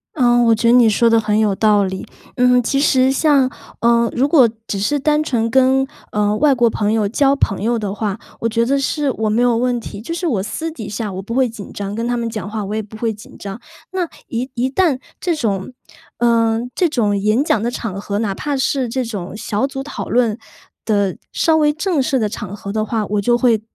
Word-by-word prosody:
呃， 240 -4 +4
我 230 -1 +4
觉 230 +2 0
得 - - +6
你 240 -2 +6
说 225 +3 +3
得 230 0 +4
很 215 -1 0
有 215 -2 +2
道 210 0 +3
理。 190 0 -4 0.3
嗯， 250 0 +4
其 275 +4 0
实 260 -2 +3
像， 275 -2 +3 0.3
呃， 235 0 +3
如 260 +3 +2
果 275 -7 +5 0.2
只 200 - -2
是 285 +9 0
单 300 +2 +2
纯 230 -6 0
跟， 265 +1 +4 0.3
呃， 210 0 +1
外 285 -2 +4
国 240 -1 +3
朋 210 -1 -1
友 215 -2 +1
交 275 +6 +2
朋 195 -8 -1
友 235 +2 +1
的 205 -3 -3
话， 210 -1 -3 0.2
我 230 - 0
觉 230 +1 +1
得 275 +3 +1
是 285 0 0
我 220 -2 -1
没 225 +3 +1
有 240 -2 +3
问 245 0 0
题。 205 -2 -8
就 285 +9 -5
是 350 +1 -3
我 230 - 0
私 320 +11 -4
底 225 -10 -7
下， 205 -1 -4
我 185 - -5
不 230 +5 -6
会 260 -1 +3
紧 220 -3 -9
张， 200 0 -5
跟 230 +2 -2
他 245 0 0
们 235 - -2
讲 210 -3 -5
话， 215 -1 -4
我 205 - -5
也 220 - -1
不 215 +1 -11
会 225 -1 -1
紧 210 - -14
张。 200 +2 -7 0.3
那 370 -2 -1 0.2
一 250 +3 -3
一 245 +2 0
旦 280 -2 +1 0.2
这 345 -3 0
种 205 -7 -2 0.5
呃， 230 -1 +2
这 355 - +1
种 215 -8 +1
演 215 +7 +2
讲 220 -8 +1
的 235 - 0
场 220 -5 -5
合， 200 0 -3
哪 210 -3 -1
怕 285 +7 -3
是 265 -1 0
这 255 +1 -2
种 200 -3 -6
小 220 +3 -1
组 270 -1 -6
讨 290 - -6
论， 235 -2 +1 0.4
的 200 -4 +1 0.2
稍 320 -1 +2
微 300 -1 +3
正 315 -1 0
式 265 +1 +1
的 215 -3 +1
场 205 -2 -6
合 200 -1 -7
的 215 0 0
话， 215 0 -1
我 205 0 -1
就 240 +4 +2
会 240 -4 +2
230 Hz, 255 characters per minute, -18 LUFS, 210-265 Hz, 0.5 s, 得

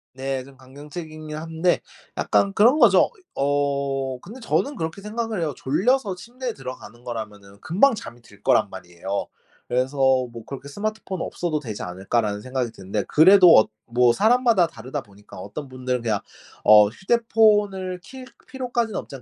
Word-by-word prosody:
네 130 0 -3
좀 135 0 -16
강경책이긴 150 +3 -9
한데 165 +2 0 0.4
약간 200 0 +2
그런 240 +10 +5
거죠. 205 -8 +6 0.3
어 140 -2 -1
근데 220 - -11
저는 280 +4 -1
그렇게 165 0 -5
생각을 220 0 -3
해요. 155 -3 -1
졸려서 195 - +1
침대에 240 +6 -6
들어가는 125 -2 -10
거라면은 105 -4 -8
금방 220 +11 +3
잠이 120 - -10
들 105 -3 -19
거란 120 -4 +3
말이에요. 95 +1 -5 0.4
그래서 130 +3 -1
뭐 130 -4 +1
그렇게 140 +1 -8
'스마트폰 205 +1 -4
없어도 160 -4 -2
되지 110 -7 -6
않을까?'라는 100 +4 -2
생각이 125 0 -3
드는데 100 0 -4
그래도 180 +2 +7
어 - - +2 0.2
뭐 120 0 +4
사람마다 225 - +3
다르다 130 -4 -6
보니까 105 0 -16
어떤 130 +8 -7
분들은 130 -1 -3
그냥 110 -4 0 0.5
어 105 -1 +8
휴대폰을 205 - +1
킬 260 +5 -11 0.2
필요까지는 245 -4 -2
없지 - - -9
않 130 - -10
140 Hz, 360 characters per minute, -23 LUFS, 120-200 Hz, 0.5 s, 어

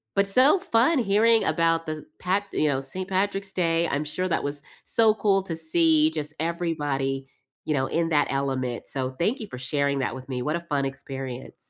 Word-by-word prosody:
but 200 0 +2
so 265 - +5
fun 255 +4 +3
hearing 225 +2 +4
about 165 -1 +1
the 155 -1 -5
pat 195 +3 0
you 155 - +2
know, 135 -2 +1
Saint 185 +8 -6
Patrick's 195 +1 -1
Day. 165 -2 +1
I'm 145 +2 -1
sure 185 +5 -2
that - - 0
was 145 0 -5 0.2
so 225 -2 +3
cool 195 -3 +2
to 165 -4 -5
see 160 -1 +3
just 155 -1 -5
everybody, 145 -5 -1 0.4
you 155 - 0
know, 130 -1 +1
in 165 0 0
that 145 -2 +3
element, 130 -3 -2
so, 130 -1 -2
thank 215 +10 +1
you 220 - -6
for 125 - -8
sharing 140 +1 0
that 130 - -1
with 130 +1 -10
me. 125 -1 -3
What 150 +3 0
a - - -7
fun 145 -5 -1
experience. 135 -1 -6
160 Hz, 200 wpm, -25 LUFS, 135-190 Hz, 0.4 s, so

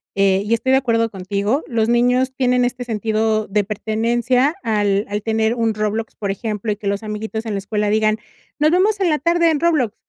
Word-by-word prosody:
eh, 195 -1 +3
y 215 +3 -1
estoy 230 +3 +1
de 265 - +6
acuerdo 230 -3 +1
contigo, 200 - -1
los 230 -3 0
niños 250 +2 +2
tienen 250 -1 +2
este 245 0 -3
sentido 220 -1 0
de 205 +1 +1
pertenencia 235 - 0
al 205 -2 +1
al 205 +1 -2
tener 220 +1 0
un 230 -2 0
Roblox, 215 +1 -2
por 200 -2 -3
ejemplo, 210 +1 -3
y - - -1
que 205 - -6
los 200 +1 -1
amiguitos 220 +1 -5
en 220 - -3
la 200 - -1
escuela 210 +1 -1
digan: 215 0 +2 0.4
"Nos 305 +1 +3
vemos 395 +4 +2
en 375 -3 +2
la 305 - +1
tarde 335 +3 +3
en 305 - 0
Roblox", 300 -10 +1
225 Hz, 210 wpm, -19 LUFS, 210-250 Hz, 0.4 s, de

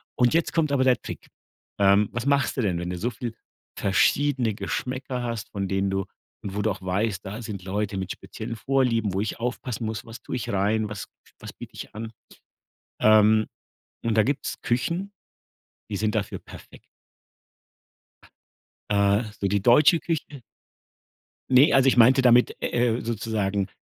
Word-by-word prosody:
und 125 +2 +3
jetzt 165 0 +1
kommt 155 -3 +1
aber 130 -2 +2
der 130 -1 +3
Trick. - - -8 0.5
Ähm, 100 +1 +4
was 120 +1 -3
machst 140 -1 +2
du 130 - 0
denn, 90 -6 0
wenn 90 0 -4
du 90 - -4
so 115 +7 -1
viel 120 -2 -6 0.4
verschiedene 125 +4 +2
Geschmäcker 125 +3 -4
hast, 115 -3 -4
von 100 -1 -3
denen 95 0 0
du 95 0 -1 0.4
und 100 -1 -6
wo 105 - -1
du 110 - +1
auch 95 -1 -7
weißt, 95 +1 -1
da 105 +4 -6
sind 105 -4 -6
Leute 100 0 -2
mit 95 -1 -4
speziellen 115 +1 -7
Vorlieben, 115 -4 +1
wo 95 - -1
ich 110 +2 -3
aufpassen 125 -1 -3
muss: 110 -2 -4
„Was 115 +2 -10
tue - - -4
ich 115 - -5
rein, 105 +2 +1
was 105 -1 -6 0.3
was - - -8
biete - - -11
ich - - -9
an?“ 110 +1 -6 0.9
Ähm, 110 0 +5 0.6
und 115 -1 +1
da 110 - +6
gibt's 140 +4 -3
Küchen, 170 +11 -1 0.8
die 105 - -3
sind 105 +1 0
dafür 105 -2 -2
perfekt. - - -14 2.1
Äh, 100 +2 +3 0.2
so 100 - 0
die 100 +1 +1
deutsche 145 - +5
Küche. 150 -5 -4 1.1
Ne, 130 +3 +6
also, 135 -1 +5
ich 135 - +4
meinte 125 +3 +6
damit, 125 -1 +5
äh, 120 -1 +1
äh, - - -5
sozusagen 105 -4 -1
110 Hz, 170 wpm, -25 LUFS, 100-125 Hz, 2.1 s, da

